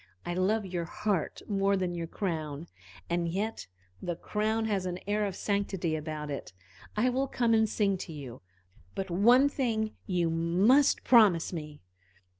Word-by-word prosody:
I 175 - -2
love 200 +4 +1
your 175 -2 -3
heart 190 -1 -2
more 200 -1 +2
than 180 -2 -1
your 170 -1 -4
crown, 160 -5 -3 0.4
and 170 0 0
yet 205 +6 -3 0.3
the 175 - -3
crown 220 +4 -1
has 195 -4 -1
an 180 0 -3
air 205 +1 0
of 190 - -5
sanctity 195 -6 -1
about 155 -1 -5
it. 140 - -6 0.4
I 250 +4 +3
will 265 +2 0
come 235 -3 +1
and 220 -1 +3
sing 200 -3 +1
to 175 - -7
you 135 -5 -8 0.5
but 195 -1 -4
one 240 +10 +5
thing 225 -6 -1 0.2
you 175 -4 +1
must 190 - +3
promise 205 -9 +5
me." 150 -3 -7
190 Hz, 160 wpm, -29 LUFS, 170-215 Hz, 0.5 s, one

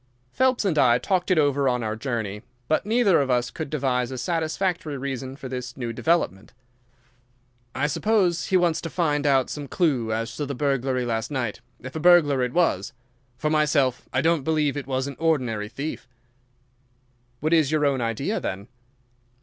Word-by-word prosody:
Phelps 260 -3 +2
and 165 -6 +1
I 120 -3 +5
talked 180 +8 -1
it 185 - +3
over 140 -2 +3
on 125 -1 -1
our 110 0 -2
journey, 110 -4 -3 0.3
but 155 +6 0
neither 220 -7 +4
of 135 - -2
us 125 -1 +1
could 160 - -5
devise 130 -4 0
a 130 - -5
satisfactory 165 +2 -1
reason 135 -1 -5
for 135 - -8
this 125 -1 -6
new 120 -3 -4
development. 140 - 0 1.2
"I 135 - 0
suppose 180 +2 +1
he 190 - +3
wants 175 -3 +1
to 165 - -5
find 150 -4 0
out 135 -2 +2
some 145 -1 -5
clue 130 -7 0
as 115 +1 -3
to 145 - -2
the 140 - -4
burglary 135 -2 0
last 115 -2 -2
night, 130 -7 -3 0.2
if 130 +3 -9
a - - -2
burglar 155 -5 +5
it 125 -1 0
was. 140 - +1 0.4
For 150 +3 -1
myself, 150 -5 +1
I 130 - +1
don't 165 0 +2
believe 150 -1 0
it 140 -3 -5
was 130 -1 -1
an 140 -1 -6
ordinary 125 -10 0
thief." 140 +2 -6 1.3
"What 155 +3 0
is 155 -4 +3
your 155 -1 +2
own 135 -3 +1
idea, 115 -2 -1
then?" 100 +2 -5
140 Hz, 180 wpm, -24 LUFS, 125-160 Hz, 1.3 s, I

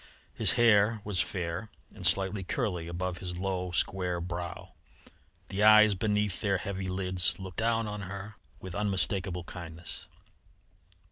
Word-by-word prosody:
His - - +2
hair 110 -1 +4
was 100 -4 +1
fair 90 +3 -3 0.2
and 95 -4 0
slightly 95 +3 +1
curly 90 -2 -2
above 90 +1 -3
his 90 -2 -5
low, 90 -1 -2
square 90 0 0
brow; 85 0 -6 0.8
the 100 - -2
eyes 110 0 +8
beneath 105 -1 0
their 100 -2 +2
heavy 95 -2 -4
lids 90 -1 +3
looked 95 -2 -9
down 115 0 +1
on 105 -1 -5
her 100 +2 -7 0.3
with 95 -2 -8
unmistakable 95 -2 -1
kindness. 85 -1 -8
95 Hz, 135 wpm, -30 LUFS, 90-105 Hz, 0.8 s, eyes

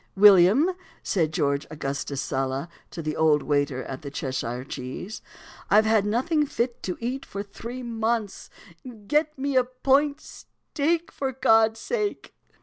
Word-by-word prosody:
"William," 205 - +7 0.3
said 160 -5 0
George 140 -2 0
Augustus 140 -2 -4
Sala 135 +3 -2 0.2
to 165 - -7
the 155 0 -2
old 155 -2 +3
waiter 145 -3 0
at 130 - -7
the 140 - -6
"Cheshire 130 -3 -3
Cheese," 135 - -7 0.5
"I've 215 +1 +5
had 215 -2 +3
nothing 280 +9 +1
fit 240 -2 -2
to 180 - -4
eat 250 +3 -3
for 200 +1 -6
three 235 +5 -8
months; 225 -2 -2 0.6
get 300 +5 +1
me 275 +1 -2
a 255 - +5
point 270 +3 +1
steak, 330 +3 -3
for 270 -1 -3
God's 225 -3 +3
sake!" 425 - -3
215 Hz, 145 wpm, -25 LUFS, -, 0.6 s, William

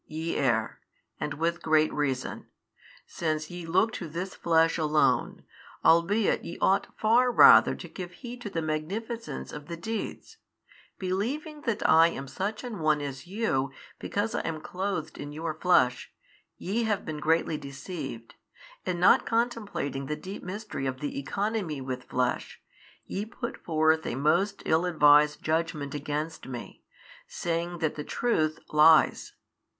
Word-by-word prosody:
ye 160 +1 -3
err, 120 -5 0 0.4
and 145 - -3
with 170 +3 -1
great 155 -1 +3
reason, 135 -3 -2 0.6
since 155 -1 -3
ye 175 -1 -7
look 190 +7 +2
to 170 - -5
this 180 +5 -4
flesh 165 0 +2
alone, 155 -1 +1 0.4
albeit 185 +6 +3
ye 170 - -7
ought 195 +1 +2
far 240 +3 +4
rather - - +8
to - - -9
give 180 -2 -8
heed 245 -1 -9
to 220 - -5
the 165 -4 -3
magnificence 200 +10 -4
of 150 0 -8
the 170 0 -5
deeds: 225 - -5 0.6
believing 255 +12 -3
that 220 -2 +1
I 165 +1 +7
am 140 -5 -5
such 200 - -4
an 240 -5 -6
one 155 -1 +2
as 140 +1 -6
you 180 - -1 0.3
because 210 +3 -2
I - - 0
am 160 -1 -3
clothed 180 -3 -4
in 145 0 -6
your 160 +1 -3
flesh, 155 -7 +2 0.5
ye 225 +6 -1
have 210 -3 -1
been 155 -1 -4
greatly 160 0 +1
deceived, 140 -4 -7 0.5
and 180 -2 -2
not 180 - +6
contemplating 210 - -1
the 150 - -2
deep 190 +5 -8
mystery 190 -6 -5
of 130 -1 -3
the 145 -1 -3
Economy 195 0 -2
with 130 -1 -5
Flesh, 125 -1 -2 0.5
ye 195 - -3
put 235 +2 -7
forth 160 -1 +2
a - - -2
most 175 +9 +1
ill 160 +3 +2
advised 150 -3 +5
judgment 155 -3 -1
against 150 +2 -4
Me, 125 -3 -8 0.4
saying 170 +1 -3
that 160 -3 -1
the 150 - -5
Truth 155 -7 0 0.2
lies. 155 0 +5
165 Hz, 150 wpm, -28 LUFS, 150-200 Hz, 0.6 s, rather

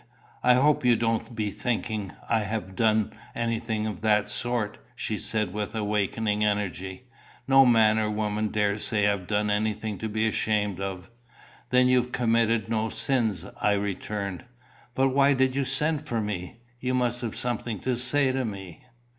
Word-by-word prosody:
"I 125 0 +5
hope 145 +3 +3
you 125 -1 +5
don't 115 +1 -1
be 105 -2 -1
thinking 110 -5 -2 0.2
I 115 -2 +2
ha' 100 -2 -4
done 110 +1 +2 0.2
anything 115 -2 -1
of 105 -3 -4
that 105 -2 +2
sort," 120 -4 -2 0.2
she 110 -2 -3
said 105 -3 -1
with 105 +1 -4
wakening 105 0 0
energy. 95 -1 -2 0.4
"No 135 -1 +7
man 110 -2 +5
or 110 -1 0
woman 105 0 -1
dare 105 0 0
say 105 -1 +1
I've 100 -3 -1
done 105 0 +1
anything 105 0 -1
to 110 - -3
be 110 +1 +1
ashamed 105 -3 0
of." 95 +1 -5 0.6
"Then 125 0 +5
you've 125 -1 +2
committed 115 -3 +2
no 110 0 0
sins?" 110 -9 -1 0.2
I 105 - +3
returned. 100 -1 -3 0.5
"But 135 0 +3
why 140 +1 +4
did 130 0 +2
you 140 -1 +1
send 150 +3 0
for 115 -4 -1
me? 105 0 -4 0.2
You 130 +1 -1
must 120 -1 0
have 115 -3 -4
something 120 -2 -3
to 130 -1 0
say 130 +3 +2
to 130 0 -1
me." 95 -7 -7
110 Hz, 165 wpm, -26 LUFS, 105-120 Hz, 0.6 s, No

